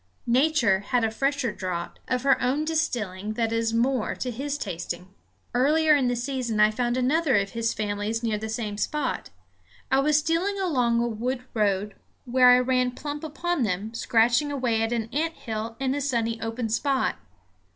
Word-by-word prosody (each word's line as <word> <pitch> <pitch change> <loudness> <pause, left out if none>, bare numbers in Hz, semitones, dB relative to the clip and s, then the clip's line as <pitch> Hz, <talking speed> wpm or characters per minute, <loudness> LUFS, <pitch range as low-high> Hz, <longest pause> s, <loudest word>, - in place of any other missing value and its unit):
Nature 245 -5 +3
has 240 +4 0
a 220 - +1
fresher 275 0 0
draught, 180 -4 -5
of 250 -1 -1
her 275 -1 +3
own 270 +5 +1
distilling, 215 - -2
that 230 0 -1
is 230 0 0
more 235 +1 +1
to 250 - -3
his 280 +5 -3
tasting. 180 -4 -5 0.4
Earlier 300 +5 +4
in 270 -3 +2
the 245 - +1
season 240 -3 -2
I 210 0 +6
found 240 +2 -1
another 280 +3 +2
of 200 -1 +1
his 230 -1 -1
families 210 +2 -2
near 220 -2 0
the 220 +1 -5
same 215 -2 -3
spot. 295 0 -2 0.6
I 265 - +4
was 295 +2 +3
stealing 330 +6 0
along 250 -11 +1
a - - 0
wood 245 +3 -3
road 205 -2 0 0.3
when 255 +1 +1
I 250 0 +8
ran 250 0 +1
plump 295 0 -5
upon 330 +1 -2
them, 210 0 -1
scratching 235 +5 +2
away 245 -5 0
at 225 +1 0
an 230 -2 -1
ant 325 +3 -1
hill 225 0 -5
in 265 -1 0
a 285 - -2
sunny 230 -4 -1
open 225 0 -3
spot. 265 +4 0
245 Hz, 180 wpm, -26 LUFS, 220-275 Hz, 0.6 s, I